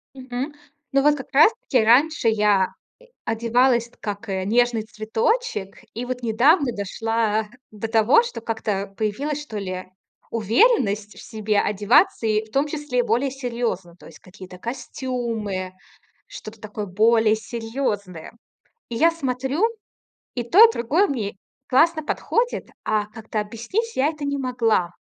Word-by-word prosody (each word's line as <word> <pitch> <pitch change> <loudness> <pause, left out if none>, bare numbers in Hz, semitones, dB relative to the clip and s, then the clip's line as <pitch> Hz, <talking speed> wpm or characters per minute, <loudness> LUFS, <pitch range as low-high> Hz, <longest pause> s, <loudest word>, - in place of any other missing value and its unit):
Мгм. 260 +2 -5 0.4
Ну, 275 0 +3
вот 295 0 +4
как 265 - -8
раз 300 +10 +7
таки 255 - +2
раньше 260 +2 +4
я, 210 -3 +3 0.4
э, - - -23 0.2
одевалась 235 +1 +2
как, 205 +1 -5
э, 190 -1 -2
нежный 235 +2 +2
цветочек, 220 - -2 0.2
и 240 +2 -4
вот 250 0 -5
недавно 260 - +3
дошла 220 +1 -1 0.2
до 215 +1 -5
того, 225 - +5
что 475 - -6
как-то 210 -3 -3
появилась, 275 +8 -2
что 230 -8 -6
ли, 185 -2 -4 0.5
уверенность 220 - +2
в - - -11
себе 215 -2 -1
одеваться, 210 - +3
и 215 0 +1
в 220 - -21
том 275 +2 +2
числе 295 -5 -1
более 250 +4 +1
серьёзно. 235 -9 -3
То - - -16
есть - - -13
какие-то 185 -1 -13
костюмы, 235 -5 -4 0.6
что-то 225 - -10
такое 210 -1 -6
более 220 +3 +3
серьёзное. 215 - -4 0.6
И 235 - -5
я 330 +7 +5
смотрю, 275 - -1 0.7
и 240 - -1
то, 380 - +7
и 455 - +6
другое 310 - +1
мне 220 -8 -3 0.3
классно 315 +4 +3
подходит, 475 +8 -1 0.2
а 215 -1 0
как-то 220 0 -5
объяснить 235 - -3
я 265 - +3
это 300 -2 -5
не 280 0 -1
могла. 230 -9 +1
230 Hz, 145 wpm, -23 LUFS, 210-270 Hz, 0.7 s, раз